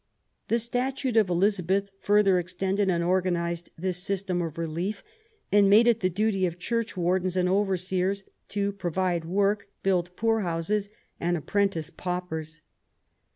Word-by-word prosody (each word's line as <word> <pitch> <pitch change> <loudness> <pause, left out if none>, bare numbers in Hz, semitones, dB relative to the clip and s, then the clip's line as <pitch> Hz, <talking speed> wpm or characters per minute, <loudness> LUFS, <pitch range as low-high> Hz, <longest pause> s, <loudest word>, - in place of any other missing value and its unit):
The 230 - +2
statute 250 +2 -1
of 215 -4 +4
Elizabeth 195 +1 +1
further 200 -3 +4
extended 190 +3 -1
and 170 -2 +1
organized 175 -1 0
this 180 +1 -2
system 185 -1 -1
of 165 -2 -4
relief, 170 +5 -3 0.5
and 205 -1 +5
made 220 +4 +6
it 235 -2 +4
the 185 - +1
duty 195 0 +1
of 170 0 -6
church 230 +3 -2
wardens 180 +1 +1
and 180 0 +2
overseers 190 0 0 0.2
to 200 -1 -1
"provide 180 -3 -1
work, 200 +3 +1 0.2
build 180 -2 +1
poor 225 +1 +1
houses, 195 +3 -1 0.3
and 175 +1 0
apprentice 170 -1 -1
paupers." 165 -3 -4
185 Hz, 140 wpm, -27 LUFS, 175-200 Hz, 0.5 s, made